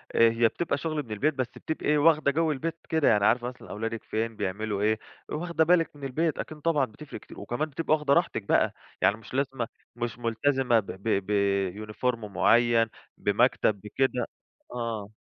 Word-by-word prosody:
أ -, -, 0 dB
هي 115 Hz, 0 st, +3 dB
بتبقى 160 Hz, +4 st, -2 dB
شغل 155 Hz, 0 st, -2 dB
من 110 Hz, -, -12 dB
البيت 140 Hz, +9 st, +1 dB
بس 130 Hz, -3 st, -1 dB
بتبقي 150 Hz, -1 st, -1 dB
واخدة 150 Hz, -1 st, +4 dB
جَوّ 160 Hz, +1 st, +1 dB
البيت 165 Hz, +4 st, -3 dB
كده، 160 Hz, -3 st, +2 dB
يعني 105 Hz, -2 st, +4 dB
عارفة 120 Hz, +2 st, +3 dB
مثلًا 125 Hz, 0 st, -9 dB
أولادِك 115 Hz, +2 st, -4 dB
فين 110 Hz, 0 st, -2 dB
بيعملوا 100 Hz, +1 st, -2 dB
إيه، 110 Hz, +1 st, +2 dB, 0.3 s
واخدة 165 Hz, 0 st, 0 dB
بالِك 165 Hz, -2 st, +3 dB
من 140 Hz, -, -13 dB
البيت، 155 Hz, +4 st, 0 dB
أكيد 155 Hz, -, -5 dB
طبعًا 150 Hz, -4 st, +2 dB
بتفرِق 140 Hz, +7 st, -10 dB
كتير، -, -, -13 dB
وكمان 150 Hz, +6 st, -2 dB
بتبقى 155 Hz, +2 st, 0 dB
واخدة 150 Hz, -2 st, +1 dB
راحتِك 170 Hz, -, +1 dB
بقى، -, -, +2 dB, 0.3 s
يعني 105 Hz, -, +4 dB
مش 115 Hz, -, -14 dB
لازمة 135 Hz, -3 st, -1 dB, 0.3 s
مش 120 Hz, -1 st, -4 dB
ملتزمة 120 Hz, +1 st, +2 dB
ب 100 Hz, -, -6 dB
ب 100 Hz, -1 st, -1 dB
ب 100 Hz, 0 st, 0 dB
uniform 125 Hz, +3 st, 0 dB
معيّن، 115 Hz, +2 st, +3 dB, 0.3 s
بمكتب، 100 Hz, -3 st, +2 dB
بكده، 125 Hz, +3 st, 0 dB, 0.5 s
آه. 115 Hz, -4 st, -3 dB
120 Hz, 175 wpm, -27 LUFS, 110-150 Hz, 0.5 s, واخدة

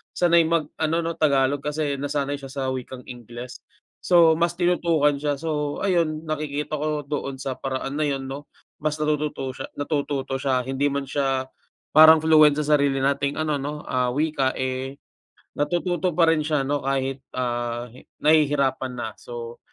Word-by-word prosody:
sanay 170 Hz, -1 st, +4 dB
mag-ano, 160 Hz, 0 st, 0 dB
'no, 165 Hz, 0 st, -3 dB
Tagalog. 140 Hz, -1 st, +2 dB
Kasi 150 Hz, -1 st, -1 dB
nasanay 145 Hz, 0 st, -1 dB
siya 135 Hz, -1 st, -9 dB
sa 135 Hz, -1 st, -3 dB
wikang 130 Hz, 0 st, -6 dB
Ingles. 120 Hz, +1 st, -9 dB, 0.4 s
So 170 Hz, -3 st, +6 dB
mas 170 Hz, +1 st, +1 dB
tinutukan 170 Hz, -4 st, +2 dB
siya. 145 Hz, 0 st, -2 dB
So, 150 Hz, -2 st, -2 dB
ayun 165 Hz, -5 st, 0 dB
nakikita 150 Hz, -1 st, -3 dB
ko 150 Hz, -1 st, -2 dB
doon 140 Hz, -2 st, -4 dB
sa 130 Hz, -1 st, -3 dB
paraan 135 Hz, +1 st, -4 dB
na 155 Hz, -, 0 dB
'yon, 135 Hz, -2 st, -2 dB
'no, 140 Hz, +2 st, -8 dB, 0.3 s
mas 155 Hz, 0 st, -1 dB
natututo 150 Hz, -3 st, -1 dB
siya -, -, -6 dB
natututo 140 Hz, -2 st, -2 dB
siya. 130 Hz, -1 st, +1 dB
Hindi 135 Hz, +3 st, -1 dB
man 140 Hz, -1 st, -3 dB
siya 135 Hz, -2 st, -1 dB, 0.5 s
parang 160 Hz, 0 st, +9 dB
fluent 155 Hz, -2 st, +5 dB
sa 150 Hz, -, -2 dB
sarili 140 Hz, -2 st, +1 dB
nating 140 Hz, +1 st, 0 dB
ano 155 Hz, -1 st, 0 dB
'no, 145 Hz, +2 st, -4 dB
ah, 125 Hz, -1 st, 0 dB
wika, 145 Hz, -2 st, 0 dB
eh, 130 Hz, +1 st, -3 dB, 0.6 s
natututo 175 Hz, +2 st, 0 dB
pa 165 Hz, -1 st, +5 dB
rin 160 Hz, -, +2 dB
siya 150 Hz, -2 st, 0 dB
'no, 140 Hz, 0 st, -2 dB
kahit, 135 Hz, 0 st, -1 dB, 0.2 s
ah, 120 Hz, -1 st, -2 dB
hi 130 Hz, -, -16 dB, 0.2 s
nahihirapan 140 Hz, -4 st, +3 dB
na. 120 Hz, -, -3 dB
So, 120 Hz, -1 st, -8 dB
145 Hz, 160 wpm, -24 LUFS, 135-155 Hz, 0.6 s, parang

